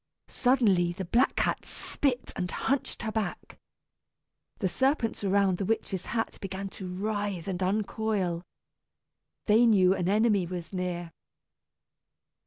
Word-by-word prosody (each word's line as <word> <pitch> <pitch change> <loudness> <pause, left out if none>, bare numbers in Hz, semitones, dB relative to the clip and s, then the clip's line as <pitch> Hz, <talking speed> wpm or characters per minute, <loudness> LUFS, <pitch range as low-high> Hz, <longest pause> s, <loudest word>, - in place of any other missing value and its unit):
Suddenly 205 -10 +3
the 190 +1 -5
black 240 +9 +2
cat - - 0
spit 255 -3 -2
and 180 - -2
hunched 275 +6 -1
her 220 - -2
back. 220 -2 -4 1.0
The 195 - 0
serpents 230 - 0
around 195 -2 +2
the 195 - -1
witch's 195 -3 -2
hat 225 0 -2
began 195 0 -4
to 190 -1 -8
writhe 205 -2 -2
and 190 -1 -3
uncoil. 195 -2 0 1.0
They 225 +3 +5
knew 190 -4 +5
an 180 -1 -1
enemy 205 -3 +3
was 175 0 -6
near. 175 -2 -3
195 Hz, 125 wpm, -28 LUFS, 180-220 Hz, 1.0 s, They